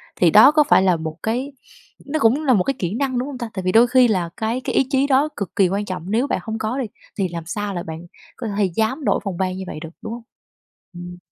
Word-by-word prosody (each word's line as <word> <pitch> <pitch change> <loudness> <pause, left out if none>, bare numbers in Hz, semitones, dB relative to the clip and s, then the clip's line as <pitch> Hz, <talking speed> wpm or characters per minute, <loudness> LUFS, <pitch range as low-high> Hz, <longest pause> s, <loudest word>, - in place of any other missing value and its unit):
thì 175 - +4
đó 215 - +8
có 305 0 +4
phải - - +6
là 185 -2 +3
một 160 -1 -5
cái 250 +6 -2 0.5
nó 310 +2 -2
cũng 275 +5 +2
là 260 - +4
một 195 -6 +3
cái 275 - 0
kỹ 180 0 -2
năng, 260 0 -1
đúng 250 +2 -2
hông 280 -3 -6
ta? 235 -2 -5
Tại 190 - -4
vì 185 - +1
đôi 230 +4 +6
khi 255 0 +5
là 185 -6 0
cái 225 +4 -2
cái - - -3
ý 265 - +3
chí 275 0 +2
đó 280 +2 +3
cực 200 -4 -5
kỳ 190 -3 +3
quan 200 +2 -2
trọng, 185 0 -6
nếu 240 +5 +1
bạn - - -1
hông 220 -1 -4
có 220 +4 -2
đi, 260 - -1 0.3
thì 190 - +1
làm 170 -1 -6
sao 205 +3 -4
là 175 - -4
bạn 160 +1 -8 0.3
có 235 - -6
thể 205 - +3
dám 240 +7 0
đổi - - +2
phòng 190 -4 -4
ban 185 -1 -1
như 190 - -5
vậy - - -6
được, 165 - -7
đúng 220 - -6
hông? 235 0 -8 0.7
Ừm. 175 0 -9
220 Hz, 280 wpm, -21 LUFS, 185-255 Hz, 0.7 s, đó